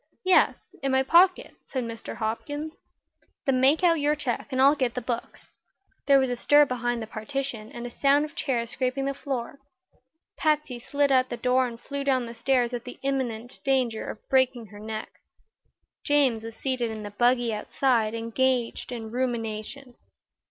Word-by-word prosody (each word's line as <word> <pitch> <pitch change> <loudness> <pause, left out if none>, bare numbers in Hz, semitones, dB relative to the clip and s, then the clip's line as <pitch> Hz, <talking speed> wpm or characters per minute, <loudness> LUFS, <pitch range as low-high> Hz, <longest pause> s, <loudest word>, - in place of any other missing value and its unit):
"Yes; 370 - +3
in 275 - 0
my 265 0 +3
pocket," 355 +6 +4
said 260 -2 -3
Mr. 230 -1 -7
Hopkins. 290 +8 -4 0.7
"Then 255 -2 +2
make 285 +7 +4
out 335 -2 +4
your 295 +1 +2
check 270 -6 -3
and 260 -2 -2
I'll 275 +2 +7
get 255 -5 -1
the - - 0
books." 240 -2 -5 0.6
There 280 -1 +7
was 265 -2 +2
a - - 0
stir 290 +4 +5
behind 240 -2 -2
the - - -5
partition 225 0 -5
and 240 0 -7
a 245 - -6
sound 280 +4 +3
of 305 - -11
chairs 235 -4 -2
scraping 260 +1 -1
the 275 - -1
floor. 275 -1 -5 0.8
Patsy 300 -5 0
slid 285 +3 0
out 255 -1 +3
the 240 - -4
door 255 +1 +2
and 230 -1 -9
flew 280 +2 -4
down 260 -3 +1
the 230 - -7
stairs 250 -1 +1
at 240 -1 -3
the 250 - -9
imminent 245 -4 -2
danger 255 -5 0
of - - -9
breaking 260 -3 +2
her 205 - -11
neck. 215 0 -7 0.8
James 270 -6 +2
was 225 0 -8
seated 255 -3 -1
in 220 -1 -6
the 205 - -7
buggy 240 +1 +2
outside, 225 0 +1
engaged 235 +2 -1
in 225 -3 -6
rumination. 240 +1 -3
255 Hz, 175 wpm, -26 LUFS, 235-275 Hz, 0.8 s, I'll